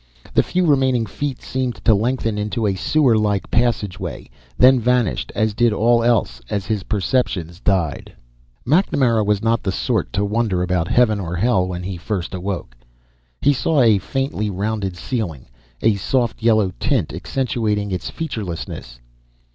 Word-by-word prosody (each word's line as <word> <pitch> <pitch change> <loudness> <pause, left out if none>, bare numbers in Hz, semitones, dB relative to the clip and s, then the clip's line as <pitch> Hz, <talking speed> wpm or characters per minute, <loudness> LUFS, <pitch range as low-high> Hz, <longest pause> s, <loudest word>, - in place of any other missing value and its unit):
The - - +5
few 180 0 0
remaining 130 -6 +2
feet 135 +5 -4
seemed 130 -2 -2
to 115 - +6
lengthen 115 0 0
into 105 +2 -2
a 100 - +2
sewerlike 110 -4 +1
passageway, 115 -5 -1 0.3
then 130 0 +6
vanished 125 -2 0
as 110 -1 +1
did 120 +2 +3
all 115 +2 +3
else 115 - +1
as 100 -2 -2
his 110 -3 -1
perceptions 95 -5 -1
died. 95 -8 -1 0.5
MacNamara 130 - +2
was 105 0 0
not 115 0 +2
the 95 - -1
sort - - -1
to 100 +3 +1
wonder 105 -4 0
about 90 -2 0
heaven 110 -2 +3
or 90 -2 -4
hell 95 -1 +2
when 90 -1 -5
he 95 -1 -4
first 90 0 -4
awoke. 90 -9 -4 0.7
He 145 - +4
saw 140 +4 +1
a 110 -4 +5
faintly 135 -1 -2
rounded 100 -1 -2
ceiling, 90 - -4 0.4
a 115 - +5
soft 120 +4 -1
yellow 110 -4 +3
tint 120 - 0
accentuating 105 0 -1
its 90 - -3
featurelessness. 95 - -5
110 Hz, 150 wpm, -20 LUFS, 95-120 Hz, 0.7 s, to